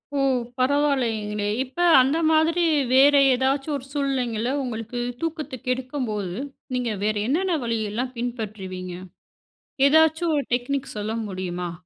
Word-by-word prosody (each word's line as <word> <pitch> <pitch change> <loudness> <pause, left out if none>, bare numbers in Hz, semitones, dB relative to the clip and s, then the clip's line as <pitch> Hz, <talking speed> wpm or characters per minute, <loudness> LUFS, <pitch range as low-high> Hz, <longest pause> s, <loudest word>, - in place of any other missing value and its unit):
ஓ! - - +1 0.4
பரவாயில்லைங்களே. 245 -7 +1 0.2
இப்ப 265 +5 -12 0.2
அந்த 275 +5 +1
மாதிரி 320 +2 +3 0.3
வேறு 280 +2 +6
ஏதாச்சும் 270 +3 0
ஒரு 265 - -11
சூழ்நிலைங்கள, 255 -5 -1 0.2
உங்களுக்கு 235 -1 -5 0.2
தூக்கத்த 310 -4 -3
கெடுக்கும்போது, 250 -7 -2 0.4
நீங்க 245 -2 -1
வேற 215 0 +1
என்னென்ன 345 +4 +1
வழியெல்லாம் 230 +2 -2
பின்பற்றுவீங்க? 200 -7 -5 1.0
ஏதாச்சும் 320 +2 +3
ஒரு 285 - 0
டெக்னிக் 270 +2 -2
சொல்ல 210 +1 -3 0.2
முடியுமா? 180 -2 -4
255 Hz, 110 wpm, -24 LUFS, 215-285 Hz, 1.0 s, வேறு